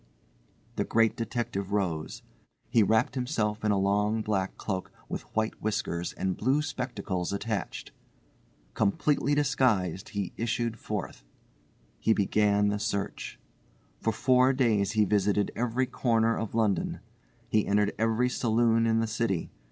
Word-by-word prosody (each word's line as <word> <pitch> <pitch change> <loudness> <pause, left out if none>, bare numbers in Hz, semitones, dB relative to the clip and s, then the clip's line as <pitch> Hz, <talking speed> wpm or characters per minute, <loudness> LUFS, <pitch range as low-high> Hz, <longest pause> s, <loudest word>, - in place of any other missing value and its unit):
The - - +2
Great 115 0 +2
Detective 115 -5 -3
rose. 90 -7 -2 0.5
He 115 - +5
wrapped 110 +3 +3
himself 115 -5 -1
in 110 - +2
a 100 - +3
long 105 +3 +1
black 95 -3 -1
cloak 95 -3 -4 0.2
with - - -4
white 110 0 -1
whiskers 90 -5 -2
and 95 -1 -2
blue 135 +6 +1
spectacles 105 - -3
attached. 100 0 -3 0.8
Completely 140 +7 +1
disguised, 120 - +1
he 100 -3 -3
issued 115 -1 -1
forth. 105 - -5 0.8
He 110 - +3
began 105 0 +2
the 105 0 -1
search. 100 -1 -3 0.6
For 115 - 0
four 130 +4 +4
days 110 -6 +2
he 105 -1 +3
visited 105 0 +1
every 125 +2 0
corner 115 -2 +1
of 110 -1 -4
London. 110 -4 0 0.5
He 110 -1 +1
entered 105 0 +2
every 115 +2 +2
saloon 115 -1 +2
in 115 0 +2
the - - +1
city. 110 -5 -1
110 Hz, 135 wpm, -28 LUFS, 100-115 Hz, 0.8 s, He